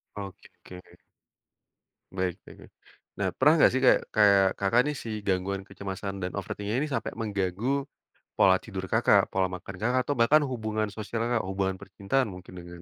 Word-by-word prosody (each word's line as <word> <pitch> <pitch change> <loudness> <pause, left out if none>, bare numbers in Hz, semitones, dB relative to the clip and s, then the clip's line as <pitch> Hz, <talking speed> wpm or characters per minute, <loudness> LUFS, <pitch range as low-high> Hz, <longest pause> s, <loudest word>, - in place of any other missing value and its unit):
Oke. 95 -2 -10 1.4
Baik 90 0 -2
baik - - -13
baik. - - -17 0.5
Nah, 95 - +1
pernah 150 +4 +5
nggak - - +6
sih 130 - 0
kayak - - +5
kayak, 100 -2 +6
Kakak, 105 +5 +3
nih 150 - -2
si 115 - -6 0.2
gangguan 95 +1 -1
kecemasan 100 0 -6
dan 90 - -2
overthink-nya 105 +3 -3
ini 150 - -1
sampai 140 - -3
mengganggu 110 +5 -1 0.5
pola 95 -1 +5
tidur, 95 -4 -7
Kakak, - - +4
pola 95 -1 +1
makan 90 +1 -8
Kakak, 125 +4 +1
atau 145 0 -2
bahkan 130 +7 +5
hubungan 110 -5 -2
sosial 110 +2 -5
Kakak, 115 -5 0
hubungan 95 0 -2
percintaan 120 +7 -1
mungkin 90 -2 -10
dengan 85 0 -11
100 Hz, 165 wpm, -27 LUFS, 95-115 Hz, 1.4 s, nggak